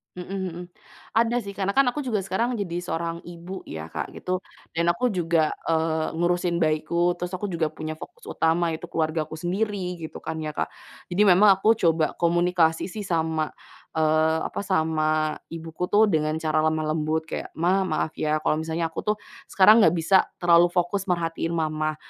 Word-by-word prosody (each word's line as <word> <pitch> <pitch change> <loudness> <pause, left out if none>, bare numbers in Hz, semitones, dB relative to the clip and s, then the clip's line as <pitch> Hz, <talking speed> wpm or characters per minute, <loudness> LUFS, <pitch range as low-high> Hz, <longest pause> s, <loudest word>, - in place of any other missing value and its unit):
Mhm 180 +2 -6 0.2
mhm. 175 +2 -7 0.5
Ada 235 +2 +3
sih, 200 - -6
karena 195 0 0
kan 275 -1 +5
aku 295 - -5
juga 235 -5 0
sekarang 230 +6 -1
jadi 175 -3 -2
seorang 170 0 -3
ibu 175 +2 -8
ya 80 0 -6
Kak, - - -4
gitu 185 0 -2 0.4
dan 170 +1 +1
aku 250 - +1
juga, 165 -4 +1 0.2
eee, 160 -1 0
ngurusin 175 +1 +1
bayiku, 160 +2 +1
terus 180 0 -4
aku 205 +3 -3
juga 165 -2 0
punya 155 0 -5
fokus 475 - -12
utama 165 +1 +1
yaitu 175 - -8
keluargaku 155 -1 -1
sendiri 185 +1 -2
gitu 160 - -7
kan 160 - -4
ya 155 - -3
Kak. - - -1 0.4
Jadi, 180 +4 +1
memang 190 +3 +6
aku 215 +4 +3
coba 165 -4 +2
komunikasi 170 -1 +2
sih 210 +1 -5
sama, 160 -2 0 0.4
eee, 160 0 +3
apa - - -6
sama 155 -4 +1 0.2
ibuku 165 +1 -6
tuh 215 +1 +5
dengan 155 -1 +1
cara 155 -1 +1
lemah 155 -1 +1
lembut 160 0 0
kayak, - - -5
"Ma, 185 +3 +3
maaf 155 -1 -1
ya 155 0 +1
kalau - - +2
misalnya 165 +1 -1
aku 165 - -5
tuh 210 - +1 0.4
sekarang 210 +4 +7
enggak 180 - +5
bisa 170 +3 +4 0.2
terlalu 175 0 +6
fokus 180 +2 0
merhatiin 165 -1 -1
Mama, 155 -1 -1
170 Hz, 175 wpm, -25 LUFS, 160-185 Hz, 0.5 s, sekarang